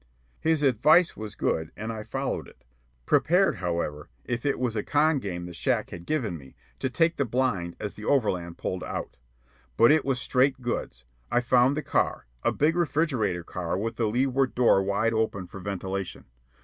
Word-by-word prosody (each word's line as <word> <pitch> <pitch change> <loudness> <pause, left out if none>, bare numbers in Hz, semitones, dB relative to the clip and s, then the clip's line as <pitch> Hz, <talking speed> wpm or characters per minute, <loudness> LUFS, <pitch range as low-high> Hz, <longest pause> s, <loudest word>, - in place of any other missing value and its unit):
His 160 -2 +1
advice 150 +7 +4
was 110 -1 -7
good, 80 0 -1
and 110 +2 -4
I 110 - -5
followed - - -3
it, - - -19 0.4
prepared, 180 +4 +3
however, 85 -4 -3 0.2
if 120 +2 -2
it 140 - +1
was 125 -3 -1
a 105 - 0
"con 150 +5 +2
game" 90 -6 -5
the 90 - -8
shack - - 0
had 85 0 -9
given 115 - -1
me, 65 -2 -15 0.2
to 130 - -1
take 165 +5 +2
the 140 - +2
blind 115 -9 -1
as 105 -2 -4
the 105 - -9
overland 90 -11 0
pulled 90 -1 -3
out. - - -5 0.6
But 115 +4 +7
it 155 -1 +4
was 135 -2 0
straight 130 +2 +2
goods. 120 - -4 0.3
I 120 - +3
found 125 +3 +3
the 155 - -2
car - - 0 0.2
a - - +2
big 155 +3 +2
refrigerator 140 - 0
car 85 +1 -3
with 115 +3 -3
the 115 - +1
leeward 130 +3 +1
door 120 -5 +5
wide 100 +4 +1
open 110 -4 -1
for 90 +2 -10
ventilation. 95 0 -4
115 Hz, 185 wpm, -27 LUFS, 95-135 Hz, 0.6 s, But